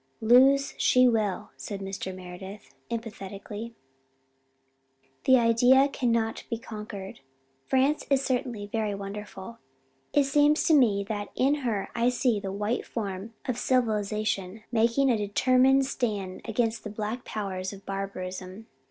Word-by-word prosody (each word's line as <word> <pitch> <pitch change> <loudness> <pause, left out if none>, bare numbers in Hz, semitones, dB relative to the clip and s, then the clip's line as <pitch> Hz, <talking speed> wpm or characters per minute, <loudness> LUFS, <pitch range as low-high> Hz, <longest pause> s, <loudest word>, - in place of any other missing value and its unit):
"Lose 265 +5 +5
she 255 0 +5
will," 215 -3 0
said 200 -2 -6
Mr. 195 -1 -5
Meredith: 185 +2 -10 0.2
emphatically. 220 0 -6 1.5
"The 260 0 +7
Idea 245 +4 +5
cannot 230 -4 0
be 230 - -1
conquered. 210 -5 -8 0.5
France 270 +3 +2
is 275 -1 +2
certainly 245 -5 -2
very 210 -1 -2
wonderful. 200 +2 -8 0.5
It 290 - +4
seems 290 +2 +3
to 320 - +3
me 220 -9 +4
that 205 0 -4
in 270 +3 +3
her 240 -9 -2
I 240 +1 +2
see 250 -3 +1
the 195 -1 -5
white 210 +4 -1
form 205 0 -5
of 250 -2 -2
civilization 215 -4 0
making 235 +4 +3
a 230 - +2
determined 255 +6 +3
stand 210 -8 -3
against 225 0 -1
the 215 - -5
black 215 +4 -4
powers 190 -3 -4
of 200 -1 -12
barbarism. 190 +1 -5
220 Hz, 130 wpm, -27 LUFS, 200-250 Hz, 1.5 s, The